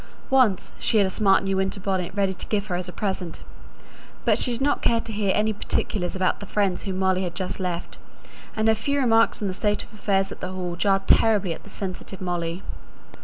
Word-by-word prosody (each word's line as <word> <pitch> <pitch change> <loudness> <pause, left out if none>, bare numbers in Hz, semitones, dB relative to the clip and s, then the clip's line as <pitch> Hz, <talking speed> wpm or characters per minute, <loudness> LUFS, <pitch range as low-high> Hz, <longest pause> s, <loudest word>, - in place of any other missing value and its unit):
Once 250 -8 +3
she 225 - +2
had 205 - +5
a 190 - -1
smart 195 -1 +3
new 195 0 0
winter 190 +1 0
bonnet 185 -2 -1
ready 195 -2 +1
to 180 - -6
give 205 -2 0
her 185 -4 -2
as 180 0 -3
a - - -6
present; 185 -4 -3 0.8
but - - +4
she 250 - +2
did 235 - -2
not 285 +1 +1
care 230 - +3
to 225 -1 -6
hear 205 -2 +1
any 215 +1 +2
particulars 195 -2 -2
about 185 -1 +1
the 205 - -8
friends 195 -3 0
whom 190 -2 -4
Molly 190 -1 +2
had 175 -2 -3
just 185 +1 -3
left; 180 -2 -4 0.6
and 220 0 +1
her 220 - +6
few 280 +6 -1
remarks 230 -4 +3
on - - +1
the 185 - -2
state 210 +2 +1
of 205 - -17
affairs 195 -2 0
at - - -8
the 185 +1 -5
Hall 180 -2 -3
jarred 195 +2 +1
terribly 205 -6 +4
on - - -10
the - - -13
sensitive 190 -1 -6
Molly. 175 0 -3
195 Hz, 225 wpm, -24 LUFS, 185-215 Hz, 0.8 s, her